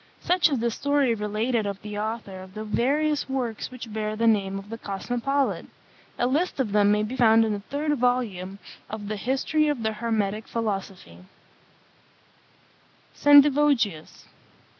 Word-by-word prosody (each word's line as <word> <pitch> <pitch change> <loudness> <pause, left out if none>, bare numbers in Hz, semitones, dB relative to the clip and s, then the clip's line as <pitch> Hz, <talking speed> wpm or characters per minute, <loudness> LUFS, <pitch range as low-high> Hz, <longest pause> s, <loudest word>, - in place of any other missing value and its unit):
Such 355 -1 +3
is 280 - 0
the 235 0 0
story 285 0 +1
related 215 +1 -1
of 200 -1 -4
the 210 0 -5
author 215 -3 -4
of 185 +1 -13
the 215 - -5
various 285 +7 0
works 245 -5 -3
which 240 -4 -9
bear 215 0 -2
the 230 +2 0
name 200 -3 +2
of 195 +2 -9
the 230 - -6
Cosmopolite. 245 +8 -2 0.5
A - - +1
list 290 +6 0
of 240 -6 0
them 205 0 +4
may 210 0 +2
be 225 +5 -4
found 225 -2 +5
in 215 - -1
the 205 - -3
third 295 +8 -2
volume 215 -7 -1 0.3
of 210 -1 -6
the 215 - -2
History 270 +7 0
of 290 -6 -1
the 220 0 0
Hermetic 215 -2 -2
Philosophy. 195 - -4 1.9
SENDIVOGIUS. 285 - +4
225 Hz, 155 wpm, -25 LUFS, 210-265 Hz, 1.9 s, found